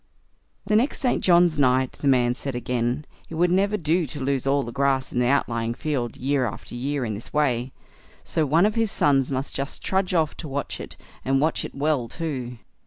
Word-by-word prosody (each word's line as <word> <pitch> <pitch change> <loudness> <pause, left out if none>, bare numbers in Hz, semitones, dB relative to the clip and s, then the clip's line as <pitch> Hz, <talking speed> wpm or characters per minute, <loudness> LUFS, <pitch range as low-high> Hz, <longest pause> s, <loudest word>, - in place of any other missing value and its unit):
The 210 +1 +1
next 240 +7 +2
St. 255 -4 0
John's 175 -3 +4
night, 130 -1 +3
the 145 - -4
man 125 -2 +4
said 135 +1 -5
again, 125 +3 -1 0.2
it 165 - -6
would 175 +2 +2
never 200 +3 +2
do 165 -1 +1
to 145 - -7
lose 135 0 -1
all 140 0 +2
the 120 - -6
grass 135 0 0
in 125 - 0
the 125 - +2
outlying 115 -4 0
field 130 -6 -2
year 135 -1 +1
after 105 - -8
year 135 +2 -2
in 110 - -2
this 105 +3 -8
way, 130 -4 +1 0.5
so 160 - 0
one 160 +6 +4
of 210 - +2
his 225 -1 +1
sons 135 -7 +2
must 135 0 -3
just 140 +1 -4
trudge 190 -1 0
off 160 -3 +1
to 160 - -6
watch 140 0 -4
it, - - -8 0.3
and 135 +1 +2
watch 155 +3 +1
it - - -7
well 140 -4 0
too. 130 -4 -4
140 Hz, 210 wpm, -24 LUFS, 125-160 Hz, 0.5 s, John's